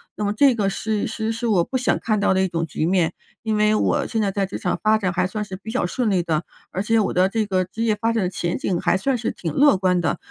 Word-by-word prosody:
那 210 - -4
么 205 - 0
这 265 +3 +4
个 205 -3 +1
是 215 +1 -2
是 220 0 -3
是 230 +1 -3
我 195 -6 +3
不 260 - -2
想 255 - +1
看 215 -2 0
到 200 - +2
的 190 - +2
一 190 - +2
种 170 -2 -2
局 155 0 -3
面。 175 -1 +1 0.3
因 220 -1 0
为 210 0 +3
我 275 +6 +1
现 225 - -1
在 200 -2 0
在 195 0 0
职 190 - -6
场 180 - -1
发 215 0 +4
展 190 -4 -1
还 180 0 0
算 210 +3 -4
是 190 -2 -7
比 220 - -8
较 250 - 0
顺 235 +5 -1
利 190 -3 +2
的， 160 -2 -1 0.3
而 190 - -2
且 225 +2 +2
我 210 - 0
的 180 +1 +3
这 220 +2 -1
个 185 -2 0
职 225 +5 -5
业 220 -2 +2
发 225 +2 0
展 225 -3 0
的 180 - 0
前 175 -2 -2
景 180 -3 -1
还 - - +2
算 260 +6 0
是 230 - -2
挺 165 -4 -5
乐 285 - +5
观 185 -1 +2
的， 165 -3 0
205 Hz, 320 characters per minute, -22 LUFS, 185-225 Hz, 0.3 s, 乐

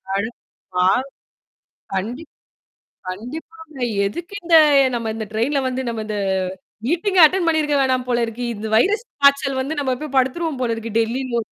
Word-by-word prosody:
அது 210 +3 -1 0.5
ஆ. - - +4 1.1
கண்டிப்ப. 240 +11 -4 0.8
கண்டிப்பாங்க. 310 - -8 0.3
எதுக்கு 345 - -5
இந்த 335 -1 +2 0.4
நம்ம 230 -2 -2
இந்த 220 -1 -4
ட்ரெயின்ல 245 +7 0
வந்து 260 0 -2
நம்ம 225 -2 -3
இந்த 215 - -3 0.7
மீட்டிங்கே 355 +5 +2
அட்டெண்ட் 350 +2 +3
பண்ணியிருக்க 305 -3 +2
வேணாம் 255 -1 +1
போல 240 -1 +1
இருக்கு. 230 +2 -5
இந்த 215 +1 -6
வைரஸ் 415 - +2 0.2
காய்ச்சல் 280 -1 +4
வந்து 285 +4 -2
நம்மப்பய் 275 +1 -3
படுத்துருவோம் 275 +3 0
போல 235 - 0
இருக்கு 225 -1 -6
டெல்லி 235 +4 -1
லோ 235 - +1
260 Hz, 145 wpm, -21 LUFS, 230-315 Hz, 1.1 s, ஆ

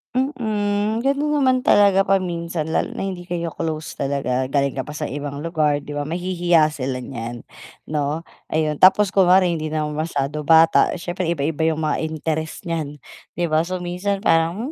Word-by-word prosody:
Mm, 220 -4 -1
ganun 290 +2 +1
naman 260 -3 +3
talaga 195 -1 +5
paminsan, 170 -4 -1
lalo - - -1
na - - -3
hindi 180 -2 -5
kayo 170 -2 -3
close 155 0 -5
talaga, 130 -2 -1
galing 140 0 +1
ka 130 - -5
pa 150 - -7
sa - - -4
ibang 145 +1 -5
lugar 155 -3 0
di 145 - -9
ba, 145 0 -3
mahihiya 175 -2 +2
sila 130 -3 -4
niyan 120 -2 -6 0.5
'no, 150 +2 -1 0.2
ayun. 155 -1 -1
Tapos 190 +1 +6
kunwari 185 -1 +4
hindi 155 -2 -2
naman 155 -1 -2
masyado 150 -2 -2
bata, 165 0 +5
siyempre 175 0 -4
iba-iba 160 -1 0
yung 160 - -4
mga 155 - 0
interest 160 +1 -4
niyan 160 -4 -4 0.4
di 175 - 0
ba, 160 +2 +2
so, 185 0 -4
minsan 195 +3 -2
parang, 170 - +1
165 Hz, 165 wpm, -21 LUFS, 150-185 Hz, 0.5 s, Tapos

